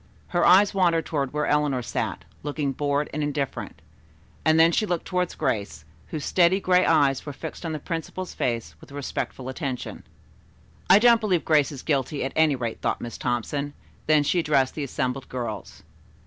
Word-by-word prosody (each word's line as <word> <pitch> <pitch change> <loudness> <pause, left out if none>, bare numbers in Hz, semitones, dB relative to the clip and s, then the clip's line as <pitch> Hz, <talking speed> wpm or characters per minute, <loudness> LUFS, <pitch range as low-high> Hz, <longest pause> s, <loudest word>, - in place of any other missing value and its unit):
Her 175 - +1
eyes 200 +3 +6
wandered 170 -4 +2
toward 140 -4 -2
where 150 0 -1
Eleanor 145 -4 +1
sat, - - -3 0.2
looking 145 -1 -2
bored 145 +2 0
and 150 - -2
indifferent, 145 -2 -3 0.6
and 160 0 +4
then 165 +1 +6
she 215 +5 +1
looked 175 -3 -2
toward 180 -1 -1
Grace, 105 - -2 0.2
whose 155 -2 -5
steady 180 +1 +3
gray 180 -1 +3
eyes 135 -2 +3
were 145 - -6
fixed 160 +4 -7
on - - -3
the 155 - -2
principal's 165 +4 -5
face 115 -2 -2
with - - -15
respectful 140 -2 -4
attention. 130 -2 -4 0.9
"I 190 - +9
don't 235 +1 +5
believe 185 -6 +1
Grace 155 -2 +3
is 135 -3 -8
guilty, 140 0 -1
at 135 - -4
any 160 -3 +4
rate," 120 -3 -4
thought - - 0
Miss 120 - -7
Thompson; 140 +4 -2 0.3
then 155 -1 +5
she 175 +5 +1
addressed 140 -5 +2
the 150 - -4
assembled 130 0 -3
girls. 125 -2 -6
150 Hz, 175 wpm, -25 LUFS, 135-170 Hz, 0.9 s, I